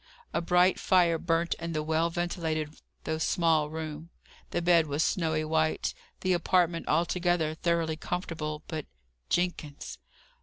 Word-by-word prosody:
A -, -, +1 dB
bright 180 Hz, +2 st, +3 dB
fire 175 Hz, -3 st, +3 dB
burnt 170 Hz, 0 st, +1 dB
in 170 Hz, 0 st, -4 dB
the 155 Hz, -1 st, -1 dB
well 160 Hz, +2 st, +1 dB
ventilated 165 Hz, -3 st, -2 dB, 0.3 s
though 160 Hz, 0 st, -2 dB
small 160 Hz, -3 st, +2 dB
room, 155 Hz, 0 st, -6 dB, 0.4 s
the -, -, -1 dB
bed 170 Hz, -2 st, +4 dB
was 145 Hz, +2 st, +1 dB
snowy 160 Hz, -3 st, 0 dB
white, 160 Hz, 0 st, +1 dB, 0.3 s
the 185 Hz, -1 st, +2 dB
apartment 175 Hz, -1 st, +1 dB
altogether 170 Hz, 0 st, +1 dB
thoroughly 165 Hz, -1 st, 0 dB
comfortable. 160 Hz, -3 st, -4 dB
But 155 Hz, -3 st, -5 dB, 0.4 s
Jenkins! 175 Hz, -5 st, -2 dB
165 Hz, 130 wpm, -29 LUFS, 155-175 Hz, 0.4 s, bed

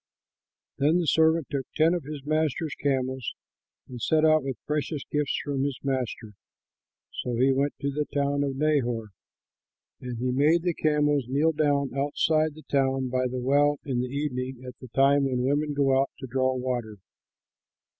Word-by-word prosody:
Then 150 Hz, +5 st, +3 dB
the 175 Hz, -, 0 dB
servant 160 Hz, 0 st, +3 dB
took 135 Hz, -3 st, -2 dB
ten 160 Hz, +2 st, +4 dB
of 175 Hz, -6 st, -3 dB
his 145 Hz, -2 st, -7 dB
master's 155 Hz, 0 st, 0 dB
camels 130 Hz, -2 st, -2 dB, 0.5 s
and 125 Hz, -2 st, -9 dB
set 155 Hz, +5 st, +3 dB
out 155 Hz, 0 st, +5 dB
with 135 Hz, -3 st, -4 dB
precious 150 Hz, -1 st, -2 dB
gifts 150 Hz, -2 st, 0 dB
from 140 Hz, -2 st, -1 dB
his 140 Hz, -2 st, -2 dB
master. 125 Hz, -5 st, -3 dB, 0.9 s
So 125 Hz, -, -3 dB
he 130 Hz, +3 st, +3 dB
went 140 Hz, +2 st, 0 dB
to 140 Hz, 0 st, -1 dB
the 150 Hz, +2 st, -1 dB
town 140 Hz, 0 st, 0 dB
of 140 Hz, -1 st, -2 dB
Nahor. 125 Hz, -7 st, 0 dB, 0.9 s
And 125 Hz, -2 st, -6 dB
he 125 Hz, +2 st, -1 dB
made 150 Hz, +6 st, +3 dB
the 175 Hz, -1 st, +1 dB
camels 150 Hz, -3 st, +1 dB
kneel 145 Hz, +5 st, +2 dB
down 145 Hz, -3 st, +1 dB
outside 155 Hz, +2 st, +1 dB
the 155 Hz, -, -13 dB
town 135 Hz, -2 st, +1 dB
by 130 Hz, 0 st, 0 dB
the 125 Hz, +1 st, -4 dB
well 145 Hz, +3 st, +2 dB
in 130 Hz, -4 st, -1 dB
the 125 Hz, -, -2 dB
evening, 130 Hz, -2 st, -3 dB
at 125 Hz, -, -7 dB
the 130 Hz, -, -10 dB
time 140 Hz, +3 st, +3 dB
when 125 Hz, -2 st, 0 dB
women 145 Hz, +2 st, 0 dB
go 135 Hz, -1 st, +3 dB
out 135 Hz, -, -1 dB
to 135 Hz, -, -7 dB
draw 130 Hz, +1 st, 0 dB
water. 125 Hz, -4 st, -3 dB
140 Hz, 175 wpm, -26 LUFS, 130-150 Hz, 0.9 s, out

